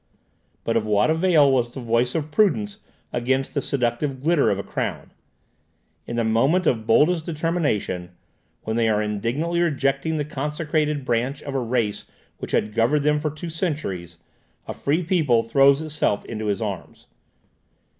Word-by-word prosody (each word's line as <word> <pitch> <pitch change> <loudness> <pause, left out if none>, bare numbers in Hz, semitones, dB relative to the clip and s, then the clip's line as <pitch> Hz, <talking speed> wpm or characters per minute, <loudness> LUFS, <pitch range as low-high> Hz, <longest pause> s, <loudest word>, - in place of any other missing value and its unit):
But 115 - -1
of 115 - +2
what 105 +6 +2
avail 160 -4 +4
was 125 -3 +1
the 135 - -8
voice 120 +1 0
of 155 -2 -2
prudence 205 +3 +1 0.3
against 130 +2 0
the 140 - 0
seductive 130 +1 -1
glitter 155 +2 +2
of 100 - +1
a 100 - -4
crown? - - -4 1.0
In 120 - -4
the 115 - +1
moment 135 +12 +2
of 115 -6 0
boldest 155 +8 +4
determination, 150 - -1 0.5
when 110 +1 -2
they 115 -1 +2
are 105 -1 +2
indignantly 115 +12 -1
rejecting 140 -1 0
the 150 - -1
consecrated 150 0 -2
branch 125 +3 -1
of 140 - -6
a 135 - 0
race 115 -4 -1 0.3
which - - -6
had 105 - 0
governed 130 +6 +2
them 150 0 +3
for 155 +1 -1
two 155 +3 -7
centuries, 120 - -3 0.5
a - - -4
free 155 +6 0
people 155 - +2
throws 135 +5 +4
itself 150 -9 0
into 110 -2 -5
his 105 +2 -1
arms. 100 -5 -6
135 Hz, 160 wpm, -23 LUFS, 115-155 Hz, 1.0 s, avail